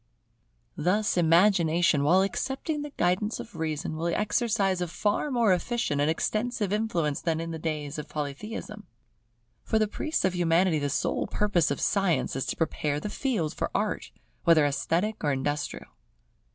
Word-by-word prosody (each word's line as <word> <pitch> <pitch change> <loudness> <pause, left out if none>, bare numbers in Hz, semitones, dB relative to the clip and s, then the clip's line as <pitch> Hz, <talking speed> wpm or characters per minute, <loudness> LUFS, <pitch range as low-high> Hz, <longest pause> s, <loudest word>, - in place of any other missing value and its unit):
Thus 205 +4 +1
imagination, 170 -3 +4
while 180 +6 +5
accepting 270 - -2
the 295 - -5
guidance 185 +5 +1
of 230 - -9
reason, 155 0 -3
will 165 +2 -2
exercise 205 0 +1
a 180 - 0
far 205 - -1
more 235 -7 +3
efficient 180 -6 -1
and 145 - +2
extensive 215 +4 -1
influence 175 -9 0
than 165 -2 0
in 165 0 -4
the 160 - -5
days 155 -2 -3
of 150 - -7
Polytheism. 210 +9 -6 0.8
For 220 - +1
the 215 -1 +2
priests 310 +6 -1
of 185 - +1
Humanity 170 -1 +3
the 145 0 -1
sole 140 - -1
purpose 185 -6 +1
of - - -2
Science 195 -9 +1
is 135 - -2
to - - -3
prepare 150 -3 -1
the 210 - -4
field 220 - -1
for - - -2
Art, - - -1 0.3
whether 165 -3 +5
esthetic 170 +9 -1
or 145 - +2
industrial. 145 +2 -2
175 Hz, 160 wpm, -27 LUFS, 155-210 Hz, 0.8 s, while